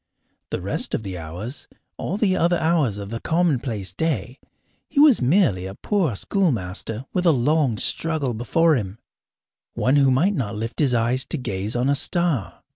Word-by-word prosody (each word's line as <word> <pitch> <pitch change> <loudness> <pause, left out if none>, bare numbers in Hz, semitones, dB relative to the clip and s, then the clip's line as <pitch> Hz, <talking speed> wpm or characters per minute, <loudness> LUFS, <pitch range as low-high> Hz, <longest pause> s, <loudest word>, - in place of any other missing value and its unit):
The - - -3
rest - - -1
of - - -4
the 95 -3 -5
hours 90 - -7 0.3
all 190 - -3
the 200 -4 +2
other 175 0 +2
hours 160 - +1
of 100 0 -7
the 115 - -3
commonplace 125 - -1
day 140 - -2 0.5
he - - 0
was 290 - +6
merely 125 - +2
a 95 - -8
poor 180 - 0
schoolmaster 115 - -1
with 180 -1 +1
a - - +7
long 140 -2 +1
struggle 155 0 +1
before 155 +8 +2
him, 100 -4 -4 0.8
one 130 +3 +2
who 140 -1 +4
might 155 +11 +3
not 115 - -3
lift 115 +2 -5
his 135 -5 +3
eyes 120 +3 +1
to - - -3
gaze 105 -3 -4
on 125 +2 +1
a 140 - +3
star. 160 - -1
130 Hz, 175 wpm, -22 LUFS, 110-165 Hz, 0.8 s, a